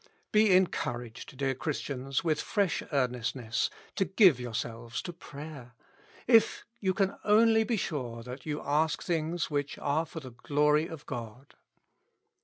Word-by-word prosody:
Be 215 -1 +5
encouraged, 125 -9 -1
dear 135 -1 +1
Christians, 135 -1 -3
with 155 -3 +1
fresh 200 -5 0
earnestness 125 -3 0 0.3
to 195 - +4
give 190 - +5
yourselves 115 -1 -4
to 175 - -5
prayer, 140 -6 -10 0.5
if 230 -2 +4
you 190 -2 0
can 195 -1 0
only 220 +1 +5
be 225 0 0
sure 125 - -3
that 125 +3 -8
you 150 -1 -3
ask 150 +2 +1
things 165 -1 -1
which 145 -1 -1
are 155 +3 0
for 160 - -7
the 130 -4 -10
glory 150 +5 +2
of 160 -3 -9
God. 120 +3 -7
150 Hz, 140 wpm, -30 LUFS, 125-175 Hz, 0.5 s, Be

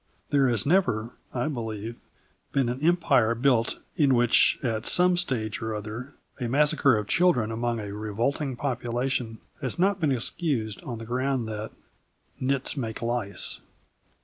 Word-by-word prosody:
There 140 -2 +4
has 115 -4 +1
never, 140 - +2 0.2
I 125 +1 -1
believe, 115 -5 -4 0.6
been 135 -3 +2
an 125 +3 -4
empire 155 -9 +3
built 120 -1 +2 0.2
in 140 -6 +4
which, 120 -1 +4
at 110 -3 -1
some 180 0 +4
stage 125 -12 -1
or 110 -1 -2
other, 110 +6 -6 0.2
a 125 - -2
massacre 140 -2 +4
of 105 - -2
children 140 -11 +3
among 115 +1 -1
a 100 -2 -5
revolting 115 +7 -2
population 120 -2 -2 0.2
has 130 +3 -1
not 195 +3 +2
been 155 -5 +2
excused 120 - -1
on 120 -3 -6
the 115 - -8
ground 130 0 -1
that 110 0 -4 0.7
"nits 135 +1 0
make 115 -5 -4
lice." 115 -4 -2
120 Hz, 145 wpm, -26 LUFS, 110-140 Hz, 0.7 s, There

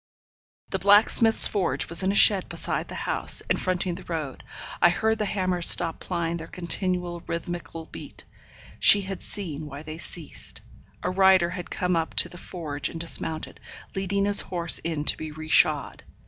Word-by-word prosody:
The - - -3
blacksmith's 215 +2 +6
forge 195 -4 -2
was 170 +1 -2
in 190 +1 +1
a - - -3
shed 200 -3 +5
beside - - -3
the - - -9
house, - - +2
and - - -1
fronting 185 -1 -1
the 180 - -8
road. 155 -6 -6 0.4
I 175 - +6
heard 220 +5 0
the 215 - -1
hammers 185 -3 -1
stop 165 -2 +3
plying 170 -2 -3
their 160 -1 -9
continual 180 0 -3
rhythmical 170 -1 -6
beat. - - -12 0.6
She 205 - +8
had 195 0 -7
seen 160 -7 -5
why 145 +1 -9
they 155 +1 -9
ceased. 165 -3 -5 0.4
A - - -1
rider 190 -2 +4
had 180 -1 -7
come 180 -1 -1
up 165 -1 -2
to - - +2
the 175 - -11
forge 155 -7 -5
and 165 - -8
dismounted, 160 -1 -2 0.3
leading 195 +1 -1
his 205 0 +4
horse 170 -2 -1
in 160 -3 -4
to - - +4
be 155 - -6
re 155 +1 -9
shod. 155 -2 +2
175 Hz, 175 wpm, -25 LUFS, 160-190 Hz, 0.6 s, She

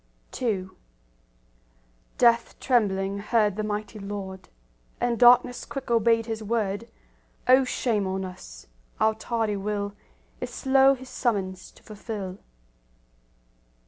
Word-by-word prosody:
II 195 -6 -1 1.5
Death 235 -1 +3
trembling 200 -5 +1
heard 210 -1 +1
the 215 - -2
mighty 210 +1 -4
Lord, 195 -2 -7 0.5
And 240 -1 0
darkness 245 0 +6
quick 270 -3 -6
obeyed 230 0 +3
His 225 -1 -4
word;— 215 0 -2 0.6
O 260 +1 +7
shame 220 -5 0
on 190 0 -2
us! - - -10 0.3
our 220 0 +3
tardy 220 -1 -2
will 205 0 -3 0.5
Is - - -4
slow 270 0 +4
His 260 0 -12
summons 190 -8 -2
to - - -21
fulfil. 205 -3 -6
215 Hz, 110 wpm, -26 LUFS, 200-235 Hz, 1.5 s, O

